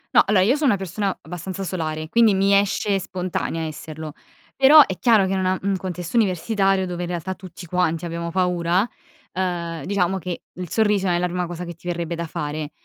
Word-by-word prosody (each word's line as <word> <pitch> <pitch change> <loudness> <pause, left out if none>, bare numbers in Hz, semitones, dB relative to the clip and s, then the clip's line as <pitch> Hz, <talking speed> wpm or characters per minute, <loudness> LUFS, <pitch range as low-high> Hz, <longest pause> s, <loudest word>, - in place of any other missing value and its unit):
No, - - +9
allora 195 -2 +4
io 245 +7 +3
sono 295 -2 +2
una 205 - +3
persona 195 +1 -2
abbastanza 185 +2 -6
solare, 155 -4 -3
quindi 225 +3 +4
mi 195 +1 +3
esce 200 0 +1
spontanea 180 -3 -3
esserlo, 155 0 -7 0.4
però 285 +3 +8
è 190 - -5
chiaro 225 -5 +4
che, 190 - -1
in 190 - 0
una 185 0 +1
in 200 - 0
un 195 - 0
contesto 180 +2 -4
universitario 195 -1 +2
dove 180 -1 -4
in 175 - -3
realtà 175 +2 -3
tutti 185 -2 -11
quanti 175 -1 0
abbiamo 170 0 -4
paura, 180 +2 +1 0.4
ehm, 170 -4 -3
diciamo 190 -1 0
che 175 0 -5
il 180 -1 -7
sorriso 210 -2 +2
non 175 - +2
è - - +1
la 180 - +1
prima 180 0 -2
cosa 175 +1 -6
che 175 - -6
ti 170 +2 -14
verrebbe 170 -1 -2
da 170 0 -4
fare, 155 -2 -4
180 Hz, 210 wpm, -22 LUFS, 170-195 Hz, 0.4 s, No